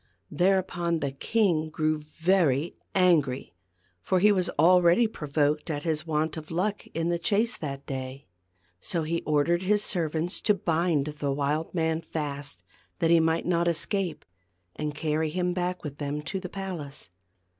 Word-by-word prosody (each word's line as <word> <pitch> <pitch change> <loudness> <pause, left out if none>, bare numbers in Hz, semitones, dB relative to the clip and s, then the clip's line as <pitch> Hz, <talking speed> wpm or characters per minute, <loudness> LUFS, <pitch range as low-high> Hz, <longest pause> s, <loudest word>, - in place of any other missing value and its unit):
Thereupon 175 -2 +1
the 140 -3 -2
king 165 +1 +1
grew 155 -1 0
very 160 -1 +1 0.2
angry; 155 - +2 0.5
for 185 - +1
he 210 +3 +6
was 185 -3 +1
already 175 +6 +5
provoked 150 -6 0
at 145 -2 -2
his, 160 0 -1
want 155 0 0
of 155 0 -8
luck 195 +5 -2
in 165 +1 0
the 170 0 0
chase 215 +7 +1
that 140 -2 -5
day. 135 -1 -3
I - - -13
he 140 - -26 0.5
So 165 - -2
he 165 +2 -1
ordered 155 +3 +2
his 210 +2 +2
ser 170 -7 0
vants 165 +4 -2
to 210 - +4
bind 165 -4 +1
the 150 -2 -3
wild 145 +5 -1
man 160 -1 +1
fast, 145 -3 -4 0.3
that 165 -2 +2
he 170 - +7
might 160 0 +1
not 170 -1 +1
escape, 175 +1 -1 0.5
and 150 -1 -3
carry 155 0 0
him 180 +2 -1
back 180 0 -2
with 145 -2 -7
them 145 0 -3
to 190 +5 -3
the 180 -1 -7
palace. 170 - -6
165 Hz, 165 wpm, -27 LUFS, 150-180 Hz, 0.5 s, he